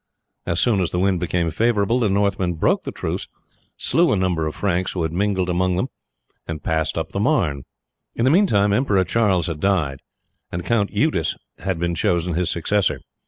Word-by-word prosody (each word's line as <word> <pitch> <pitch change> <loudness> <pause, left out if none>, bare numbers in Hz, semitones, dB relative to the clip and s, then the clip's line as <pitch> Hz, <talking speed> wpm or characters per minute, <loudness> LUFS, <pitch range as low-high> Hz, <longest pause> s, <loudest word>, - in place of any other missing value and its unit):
As 85 - 0
soon 115 -5 +3
as 90 - 0
the - - -3
wind 95 0 +2
became 85 -1 -1
favourable 115 +3 +1
the 110 -4 +2
Northmen 100 -2 +1
broke 80 - +1
the - - -3
truce, - - -4 0.5
slew 170 0 +2
a - - +3
number 90 -4 0
of 75 - -5
Franks 95 -2 -1
who 90 - -1
had 80 0 -2
mingled 95 0 0
among 90 0 +1
them, 125 +9 -1 0.6
and 80 -2 -5
passed 80 0 -1
up 80 -1 -2
the - - -3
Marne. 100 - +1 0.5
In 115 - +1
the 130 - +4
meantime 105 - +3
Emperor 105 -5 +2
Charles 95 -5 +1
had 85 -3 -4
died 80 -9 +1 0.5
and 85 +1 -4
Count 110 -4 +1
Eudes - - 0 0.2
had 95 0 -2
been 85 +1 -1
chosen 85 -1 0
his 90 +1 0
successor. 100 +4 0
95 Hz, 190 wpm, -22 LUFS, 85-105 Hz, 0.6 s, the